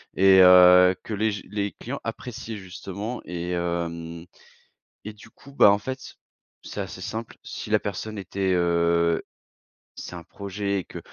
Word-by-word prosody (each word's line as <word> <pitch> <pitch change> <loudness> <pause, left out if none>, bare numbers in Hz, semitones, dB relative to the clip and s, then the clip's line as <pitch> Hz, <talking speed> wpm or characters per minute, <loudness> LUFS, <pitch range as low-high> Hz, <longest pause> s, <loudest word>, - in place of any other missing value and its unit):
et 95 0 +6
heu, 90 0 +8
que 110 - -6
les 110 +1 +1
j 100 - -7
les 100 -1 -2
clients - - -6
appréciaient 115 -3 -6
justement 100 +5 -7
et 90 0 -4
heu, 85 0 -1
hem 85 0 -8 0.8
et 105 - -6
du 105 - -16
coup, 140 0 -17
bah, 100 - +7
en 100 - +2
fait, 130 +3 -7 0.5
c'est - - -6
assez - - -7
simple. 110 +1 -6
Si - - -8
la - - +3
personne 105 +2 -5
était, 95 0 -1
heu 85 -1 +2 0.7
c'est - - -8
un 85 - -7
projet 100 0 -3
et 90 - -9
que, - - -9
95 Hz, 165 wpm, -25 LUFS, 85-105 Hz, 0.8 s, heu